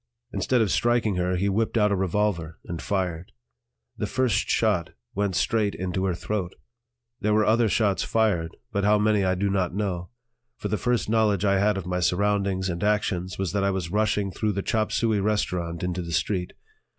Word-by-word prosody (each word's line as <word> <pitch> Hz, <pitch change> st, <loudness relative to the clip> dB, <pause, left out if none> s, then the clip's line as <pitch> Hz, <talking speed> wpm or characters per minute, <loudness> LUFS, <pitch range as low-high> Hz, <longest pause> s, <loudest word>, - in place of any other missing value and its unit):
Instead 125 Hz, -2 st, +1 dB
of 105 Hz, -5 st, +1 dB
striking 120 Hz, -5 st, +2 dB
her 90 Hz, 0 st, 0 dB
he 95 Hz, +3 st, 0 dB
whipped 110 Hz, +4 st, 0 dB
out 105 Hz, -1 st, +3 dB
a -, -, +3 dB
revolver 95 Hz, -3 st, -1 dB
and 85 Hz, -1 st, -5 dB
fired; 90 Hz, -3 st, -2 dB, 0.6 s
the -, -, -3 dB
first 120 Hz, -5 st, 0 dB
shot 100 Hz, -8 st, +1 dB, 0.2 s
went 100 Hz, -2 st, -1 dB
straight 105 Hz, 0 st, +1 dB
into 95 Hz, +1 st, -2 dB
her 90 Hz, -2 st, 0 dB
throat. 95 Hz, -1 st, -3 dB, 0.6 s
There 105 Hz, 0 st, +1 dB
were 110 Hz, 0 st, +3 dB
other 115 Hz, +1 st, +3 dB
shots 100 Hz, -2 st, +1 dB
fired, 95 Hz, -8 st, 0 dB
but 100 Hz, -2 st, -1 dB
how 105 Hz, +1 st, +4 dB
many 105 Hz, -1 st, +2 dB
I 95 Hz, 0 st, +2 dB
do 100 Hz, +2 st, 0 dB
not 95 Hz, -2 st, 0 dB
know; 90 Hz, -4 st, -2 dB, 0.5 s
for -, -, -4 dB
the 105 Hz, -, 0 dB
first 120 Hz, -2 st, 0 dB
knowledge 105 Hz, -3 st, +2 dB
I 100 Hz, -1 st, +3 dB
had 105 Hz, 0 st, +2 dB
of 95 Hz, -, -4 dB
my 90 Hz, 0 st, -1 dB
surroundings 95 Hz, +1 st, +1 dB
and 85 Hz, +2 st, -3 dB
actions 95 Hz, -3 st, 0 dB
was 95 Hz, -3 st, -2 dB
that 100 Hz, -1 st, 0 dB
I 100 Hz, -, +2 dB
was 95 Hz, -3 st, -3 dB
rushing 105 Hz, -1 st, +1 dB
through 105 Hz, +4 st, -1 dB
the 100 Hz, 0 st, -2 dB
chop 110 Hz, -2 st, 0 dB
suey 110 Hz, -3 st, +1 dB
restaurant 90 Hz, -5 st, -1 dB
into 90 Hz, 0 st, -2 dB
the 85 Hz, -1 st, -5 dB
street. 90 Hz, +1 st, -1 dB
100 Hz, 195 wpm, -25 LUFS, 90-105 Hz, 0.6 s, how